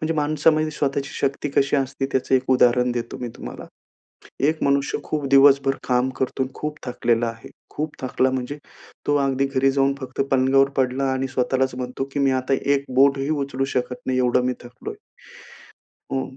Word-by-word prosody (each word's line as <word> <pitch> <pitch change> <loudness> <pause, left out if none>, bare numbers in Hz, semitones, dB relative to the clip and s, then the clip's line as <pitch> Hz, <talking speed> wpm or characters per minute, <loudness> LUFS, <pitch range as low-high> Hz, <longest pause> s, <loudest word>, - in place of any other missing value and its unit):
म्हणजे 160 +1 -1
माणसामध्ये 155 +1 +2
स्वतःची 140 -2 -2
शक्ती 140 +2 -1
कशी 140 +1 +2
असते, 135 0 -1
त्याचं 130 0 +1
एक 130 - +3
उदाहरण 125 -1 +4
देतो 120 -1 -4
मी 125 - -4
तुम्हाला. - - -8 0.7
एक 155 +3 +1
मनुष्य 140 +1 +1
खूप 150 -2 -2
दिवसभर 135 0 +5
काम 125 0 +2
करतो 130 0 -1
आणि 130 0 -4
खूप 150 0 -4
थकलेला 120 -1 0
आहे. 115 0 -9 0.2
खूप 150 +1 -4
थकला 130 0 +1
म्हणजे 130 +3 -4 0.5
तो 145 - +3
अगदी 135 0 +1
घरी 135 0 +2
जाऊन, 135 0 +2
फक्त 130 0 -6
पलंगावर 135 +1 +4
पडला 130 +1 +1
आणि 130 0 -1
स्वतःलाच 130 0 0
म्हणतो, 125 +1 -4
की 145 - -1
"मी 135 -1 +3
आता 135 +1 0 0.2
एक 140 0 +1
बोटही 140 +1 +4
उचलू 140 -3 -1
शकत 125 0 -1
नाही 130 0 0
एवढं 125 0 +2
मी 125 - +1
थकलोय." 125 +1 -9 1.2
हं 135 0 -3
135 Hz, 170 wpm, -22 LUFS, 130-140 Hz, 1.2 s, दिवसभर